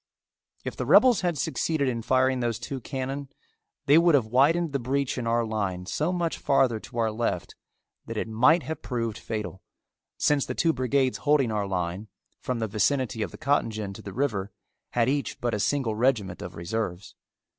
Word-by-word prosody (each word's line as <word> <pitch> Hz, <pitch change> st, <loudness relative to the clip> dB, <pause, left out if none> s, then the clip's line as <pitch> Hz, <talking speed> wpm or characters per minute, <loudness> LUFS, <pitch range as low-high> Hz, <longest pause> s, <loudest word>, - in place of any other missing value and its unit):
If -, -, -5 dB
the -, -, -4 dB
rebels 250 Hz, -5 st, +6 dB
had 175 Hz, -4 st, 0 dB
succeeded 155 Hz, 0 st, 0 dB
in 120 Hz, -2 st, -1 dB
firing 130 Hz, +2 st, +2 dB
those 120 Hz, -2 st, -1 dB
two 130 Hz, +2 st, -6 dB
cannon 135 Hz, +2 st, -4 dB, 0.6 s
they 145 Hz, +4 st, +6 dB
would 170 Hz, -2 st, +5 dB
have 130 Hz, -6 st, +3 dB
widened 145 Hz, +7 st, +2 dB
the 140 Hz, -, +1 dB
breach 135 Hz, +2 st, -1 dB
in 120 Hz, -2 st, -3 dB
our 115 Hz, 0 st, +2 dB
line 100 Hz, -5 st, -2 dB
so 155 Hz, -, -1 dB
much 175 Hz, -2 st, -1 dB
farther 125 Hz, -5 st, +2 dB
to 120 Hz, +2 st, -11 dB
our 115 Hz, -1 st, +1 dB
left 110 Hz, -5 st, -2 dB, 0.5 s
that -, -, -5 dB
it -, -, -2 dB
might 130 Hz, +10 st, +4 dB
have 160 Hz, -1 st, -5 dB
proved 115 Hz, -3 st, -3 dB
fatal, 105 Hz, -4 st, -5 dB, 0.6 s
since 145 Hz, -2 st, +2 dB
the -, -, -4 dB
two 165 Hz, -2 st, +2 dB
brigades 130 Hz, 0 st, +1 dB
holding 145 Hz, -5 st, +2 dB
our 105 Hz, -2 st, -1 dB
line, 90 Hz, +2 st, -3 dB, 0.3 s
from 125 Hz, -, -3 dB
the 110 Hz, -1 st, -1 dB
vicinity 120 Hz, +3 st, 0 dB
of -, -, -1 dB
the -, -, -11 dB
cotton 140 Hz, -4 st, +1 dB
gin 105 Hz, -3 st, -5 dB
to -, -, -10 dB
the 100 Hz, -, -8 dB
river, 105 Hz, -5 st, -1 dB, 0.4 s
had 120 Hz, -1 st, +2 dB
each 140 Hz, +1 st, -1 dB
but 120 Hz, -1 st, -1 dB
a 105 Hz, -, -1 dB
single 130 Hz, 0 st, 0 dB
regiment 110 Hz, -6 st, 0 dB
of 90 Hz, -, -7 dB
reserves. 95 Hz, +1 st, -4 dB
125 Hz, 190 wpm, -26 LUFS, 110-140 Hz, 0.6 s, rebels